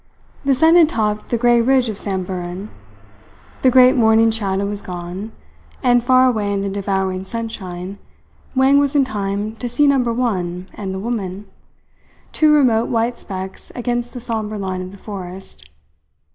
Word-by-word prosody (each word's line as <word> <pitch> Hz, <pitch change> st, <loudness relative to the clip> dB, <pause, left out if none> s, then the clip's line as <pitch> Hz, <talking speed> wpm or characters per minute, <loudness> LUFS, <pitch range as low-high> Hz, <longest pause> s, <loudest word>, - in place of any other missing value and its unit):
The 275 Hz, -1 st, +3 dB
sun 320 Hz, +5 st, +5 dB
had 325 Hz, -3 st, +6 dB
topped 210 Hz, -7 st, -1 dB
the 235 Hz, -, +1 dB
grey 240 Hz, 0 st, +4 dB
ridge 255 Hz, +1 st, +3 dB
of 215 Hz, -, -3 dB
Samburan. 185 Hz, 0 st, -4 dB, 0.9 s
The 260 Hz, -, +5 dB
great 255 Hz, +1 st, +6 dB
morning 225 Hz, -1 st, +4 dB
shadow 200 Hz, -3 st, -1 dB
was 205 Hz, 0 st, -3 dB
gone; 180 Hz, +4 st, -6 dB, 0.5 s
and 245 Hz, -2 st, +4 dB
far 255 Hz, +1 st, +5 dB
away 215 Hz, -5 st, +1 dB
in 200 Hz, -1 st, -1 dB
the 200 Hz, 0 st, -2 dB
devouring 190 Hz, -1 st, -1 dB
sunshine 195 Hz, -4 st, -6 dB, 0.6 s
Wang 265 Hz, +2 st, +5 dB
was 285 Hz, 0 st, 0 dB
in 280 Hz, -2 st, +4 dB
time 205 Hz, -1 st, -3 dB
to 245 Hz, -, -4 dB
see 295 Hz, +5 st, +2 dB
Number 265 Hz, -4 st, +3 dB
One 185 Hz, -7 st, -2 dB
and 195 Hz, -3 st, -5 dB
the 190 Hz, -, -4 dB
woman, 200 Hz, -2 st, -4 dB, 0.9 s
two 310 Hz, -1 st, +3 dB
remote 245 Hz, -6 st, +3 dB
white 235 Hz, +1 st, 0 dB
specks 190 Hz, -1 st, -7 dB
against 240 Hz, 0 st, -3 dB
the -, -, -4 dB
sombre 220 Hz, -3 st, -3 dB
line 185 Hz, -2 st, -3 dB
of 185 Hz, 0 st, -7 dB
the 200 Hz, -, -12 dB
forest. 185 Hz, -, -8 dB
215 Hz, 160 wpm, -19 LUFS, 190-245 Hz, 0.9 s, had